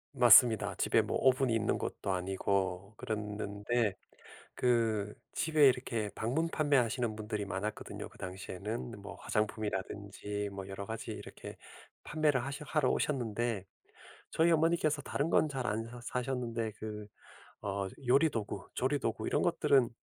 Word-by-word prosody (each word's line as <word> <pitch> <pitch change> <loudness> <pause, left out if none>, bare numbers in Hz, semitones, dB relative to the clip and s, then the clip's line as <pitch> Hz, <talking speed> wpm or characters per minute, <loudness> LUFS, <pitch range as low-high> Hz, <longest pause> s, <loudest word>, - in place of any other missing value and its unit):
맞습니다. 115 -5 +7
집에 - - +3
뭐 - - -1
오븐이 130 -2 +3
있는 110 0 +1
것도 100 - -3
아니고 95 +1 -1
그랬는데 105 -1 -1 0.6
그 110 -4 +1 0.2
집에 155 -4 +5
이렇게 115 -4 0
방문 140 +9 0
판매하시는 125 -7 +1
분들이 105 -1 -3
많았거든요 100 +2 -4
그 - - -19
당시에는. 95 +5 -5
뭐 100 - -8
화장품이라든지 105 -1 -3
뭐 100 -1 -6
여러 100 +1 -6
가지 110 +1 -5
이렇게 - - -8 0.5
판매를 150 -4 +1
하셔 140 +3 -5
하러 150 -4 +2
오셨는데 115 -6 -1 0.6
저희 165 +1 +3
어머니께서 160 -2 +2
다른 145 +4 -1
건 155 - +3
잘 135 -3 -3
안 110 +1 -1
사 120 +1 -9
사셨는데 120 -3 -2
그 105 -1 -6 0.6
어 100 -1 -2 0.2
요리 140 +6 +5
도구, 115 -6 -4
조리 140 +3 +1
도구 - - -2
이런 - - +1
것들은 130 -4 +3
115 Hz, 315 characters per minute, -32 LUFS, 105-130 Hz, 0.6 s, 맞습니다